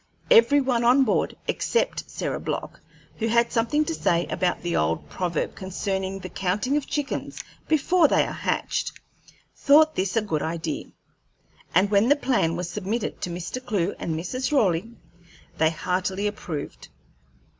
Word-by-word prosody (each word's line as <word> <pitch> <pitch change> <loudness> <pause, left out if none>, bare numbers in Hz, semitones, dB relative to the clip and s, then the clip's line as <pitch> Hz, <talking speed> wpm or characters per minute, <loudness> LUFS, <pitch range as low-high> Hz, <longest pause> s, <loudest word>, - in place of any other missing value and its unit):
Every 370 -12 +7
one 250 -3 +1
on 250 +3 +5
board 220 - 0
except 470 - -1
Sarah - - -3
Block, - - -4 0.4
who 225 - 0
had 235 +1 +2
something 295 +7 +1
to 330 - -2
say 170 - +1
about 180 -2 0
the 175 -1 -1
old 80 +1 0
proverb 175 -3 -2
concerning 190 0 -3
the 185 - -7
counting 195 - -1
of 295 -2 -1
chickens 290 -2 -3 0.2
before 315 +2 +4
they - - +3
are - - -5
hatched - - -2 0.6
thought 310 +2 +5
this 190 +3 -1
a 225 - +2
good 160 -8 -1
idea, 160 -1 -3 0.9
and 195 +3 +4
when 205 +4 +4
the 290 - +6
plan 240 - +1
was 175 0 -3
submitted 210 +5 -3
to - - -3
Mr. 175 +9 -5
Clewe 200 -6 -1
and 165 - -2
Mrs. 220 - -3
Raleigh, 205 - +2 0.7
they 160 0 +4
heartily 185 +4 -2
approved. 180 -8 -5
200 Hz, 155 wpm, -25 LUFS, 175-260 Hz, 0.9 s, Every